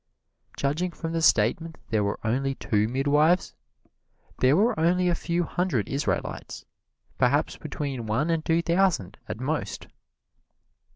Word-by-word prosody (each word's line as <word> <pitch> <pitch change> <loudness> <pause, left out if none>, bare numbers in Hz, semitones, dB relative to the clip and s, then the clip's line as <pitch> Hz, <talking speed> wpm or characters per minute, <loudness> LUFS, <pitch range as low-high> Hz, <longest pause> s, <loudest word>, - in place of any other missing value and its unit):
Judging 150 +6 0
from 165 -1 -6
the 165 - 0
statement 160 +6 +2
that - - -30
there 110 -2 +2
were 100 +1 -2
only 135 +4 0
two 105 -5 0
midwives, 145 +7 +2 0.9
there 130 +4 +4
were 225 +5 +3
only 180 +2 +2
a 175 - +3
few 170 +1 -1
hundred 175 - -1
Israelites 140 +2 -3 0.5
perhaps - - +2
between 135 -6 -5
one 130 +10 0
and 165 -1 0
two 165 +1 +1
thousand, 170 - +1
at - - -4
most. 150 +4 -3
150 Hz, 135 wpm, -26 LUFS, 130-170 Hz, 0.9 s, there